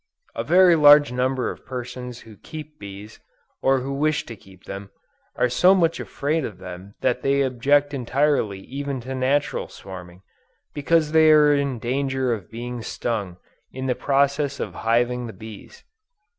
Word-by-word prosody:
A 115 - -3
very 175 +5 +5
large 145 -2 +7
number 125 0 -1
of - - -12
persons 125 -1 -7
who 110 -2 -14
keep 155 - -10
bees, 100 +2 -10 0.4
or 135 -1 +2
who 135 +2 -4
wish 150 +2 0
to 115 - -8
keep 95 -2 -19
them, 100 0 -8 0.5
are - - +2
so 180 +10 +4
much 165 -3 +1
afraid 150 +3 -2
of 105 -7 -6
them 90 +2 -10
that 125 - 0
they 140 0 +2
object 145 +3 +2
entirely 130 -6 0
even 140 +3 -5
to 130 +3 -6
natural 130 +2 0
swarming, 90 -1 -11 0.5
because 155 +1 +1
they 160 0 +6
are 150 -1 +6
in 140 -3 0
danger 130 +1 -1
of 100 -7 -7
being 120 +1 -6
stung 105 -6 -4 0.3
in 130 0 -6
the 130 - +1
process 140 +1 0
of - - -4
hiving 120 +2 0
the 110 - -8
bees. 110 - -12
130 Hz, 160 wpm, -23 LUFS, 115-145 Hz, 0.5 s, large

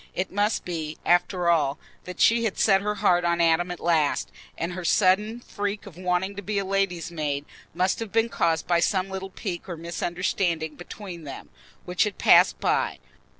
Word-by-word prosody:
It 185 +1 -2
must 205 +3 0
be, 160 -3 -4
after 175 0 +2
all, 155 -4 +2 0.3
that 180 -1 -8
she 230 0 +4
had 220 -4 -1
set 195 -2 +4
her 210 +1 -1
heart 175 -3 +3
on 170 0 +1
Adam 170 +1 +3
at 180 - -5
last, 160 -4 +1 0.3
and 170 +2 -3
her 185 0 -6
sudden 210 +6 +2
freak 205 -2 -4
of 195 -6 -11
wanting 180 +2 -1
to - - -4
be 205 +1 -3
a 200 - 0
lady's 190 -3 -1
maid 145 -3 -2 0.3
must 185 +2 +1
have 225 -3 -5
been 225 +1 +2
caused 165 -8 0
by 175 -1 +2
some 185 +2 0
little 190 0 -5
pique 190 -2 -6
or 170 - -5
misunderstanding 170 -1 -2
between 175 0 -9
them, 140 -2 -9 0.4
which 180 +3 +1
had 205 -3 -4
passed - - +5
by. - - 0
180 Hz, 190 wpm, -25 LUFS, 170-195 Hz, 0.4 s, passed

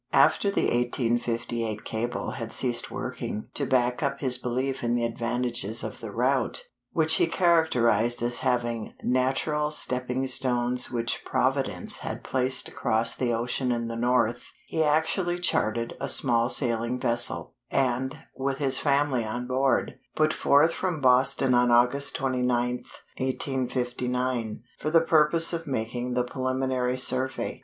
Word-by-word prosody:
After 200 - +4
the 200 - 0
1858 120 -2 -1
cable 115 +2 -3
had 115 -1 -6
ceased 120 -2 +1
working, 105 - -5
to 140 - -2
back 125 -1 +1
up 140 -2 -2
his 130 -3 +3
belief 130 +2 -3
in 120 0 0
the 120 -1 0
advantages 115 -2 -1
of - - -6
the - - -7
route, - - 0 0.3
which - - +2
he 355 - +2
characterized 120 - +2
as 120 0 +1
having 120 -3 -2
"natural 135 +4 0
stepping 125 -3 0
stones 125 -1 0
which 120 -1 -2
Providence - - -1
had - - -6
placed 130 0 +1
across 115 +1 +2
the 125 -2 -1
ocean 120 +2 -1
in 115 -1 -2
the 115 - -5
north," 120 0 0
he 160 - -1
actually 160 +4 0
chartered 115 -9 0
a - - -2
small 120 -2 +4
sailing 120 -1 +2
vessel, 120 -1 +1 0.2
and, 130 +2 -1
with 135 0 -2
his 135 -2 +1
family 140 -4 +1
on 120 +3 -4
board, 130 +2 0 0.2
put 155 0 +2
forth 150 +4 +3
from 180 -4 -2
Boston 130 0 +3
on 125 0 +3
August 125 +4 +3
29th, 125 -2 -1 0.3
1859, 125 -3 -2 0.2
for 155 - -2
the 165 +1 +4
purpose 165 +1 +3
of 165 -1 -4
making 120 0 -3
the 125 - +1
preliminary 130 0 -2
survey. 130 +1 +1
125 Hz, 140 wpm, -26 LUFS, 120-135 Hz, 0.3 s, After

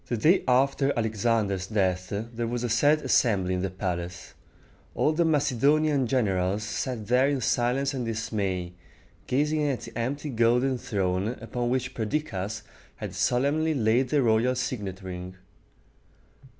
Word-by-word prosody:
The 120 - -1
day 160 - +4
after 135 +2 +3
Alexander's 110 -4 0
death 95 -4 0
there 115 +3 -4
was 120 +1 -3
a 120 - -1
sad 145 +7 +3
assembly 100 -8 +2
in 90 - -1
the 95 - -1
palace. 90 -1 -5 0.6
All 150 - +2
the 170 +2 +2
Macedonian 145 -1 +2
generals 100 -5 0
sat 110 +1 -3
there 125 +4 +3
in 140 -2 0
silence 125 +4 +1
and 130 -2 -3
dismay, 100 -5 -2 0.5
gazing 150 +4 +1
at 135 -4 -1
the 115 - -10
empty 140 +5 -3
golden 125 +2 +2
throne, 95 +2 -1
upon 120 +1 -3
which 130 0 -1
Perdiccas 110 -4 -3 0.3
had - - -6
solemnly 150 +5 +1
laid 120 +1 +2
the 145 -1 +2
royal 115 +2 +2
signet 100 -7 -4
ring. 90 0 -7
120 Hz, 140 wpm, -27 LUFS, 100-135 Hz, 0.6 s, day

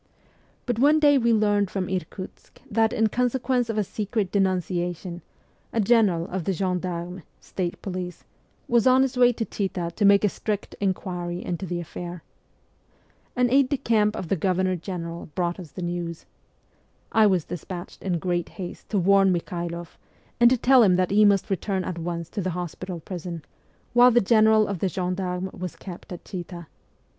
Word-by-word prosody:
But 245 -3 -1
one 295 +4 +5
day 290 -2 +5
we 235 -1 +2
learned 205 -3 +2
from 185 -2 -2
Irkutsk 185 +1 -6
that, 220 +1 +3
in 225 - +2
consequence 250 0 0
of 225 - -2
a 210 - +2
secret 205 0 -2
denuncia 180 -2 0
tion, 175 0 -8 0.5
a 230 - -1
General 205 -6 +3
of 180 -3 -3
the 195 - +1
gendarmes 180 -1 -3 0.2
(state 175 -2 -4
police) 180 -2 -5 0.4
was 235 0 +3
on 255 +1 +6
his 270 0 -1
way 245 -1 +5
to 225 -1 -3
Chita 185 -5 -3
to 215 - -1
make 200 0 +6
a - - +5
strict 205 +1 -4
inquiry 180 -2 -3
into 180 +1 -3
the 175 0 -2
affair. 175 0 -7 1.1
An 245 -1 +2
aide 270 -1 +4
de 285 - +1
camp 215 -3 +2
of 185 - -5
the - - +2
Governor 185 +1 +1
General 170 -1 -6
brought 175 0 -1
us 175 -4 -9
the 180 - -6
news. 175 -1 -4 0.9
I 220 -1 +5
was 185 -5 +1
despatched 175 +1 -7
in 180 -3 -1
great 175 0 -1
haste 180 -3 -7
to 210 - 0
warn 195 +1 +4
Mikhailoff, 170 -1 -4 0.4
and 240 0 +7
to 255 - +3
tell 255 +2 +5
him 190 -5 +5
that 185 0 +1
he 210 +1 +5
must 200 -1 +3
return 190 0 -1
at 175 -2 -4
once 170 0 -4
to 205 - -4
the 185 - -1
hospital 180 0 -5
prison, 170 -2 -6 0.5
while 245 +1 +7
the 240 0 +5
General 220 0 +4
of 200 -3 -3
the 190 - 0
gendarmes 180 +1 -3
was 180 -1 -6
kept 180 -1 -10
at 175 - -8
Chita. 175 -2 -7
190 Hz, 180 wpm, -25 LUFS, 175-215 Hz, 1.1 s, and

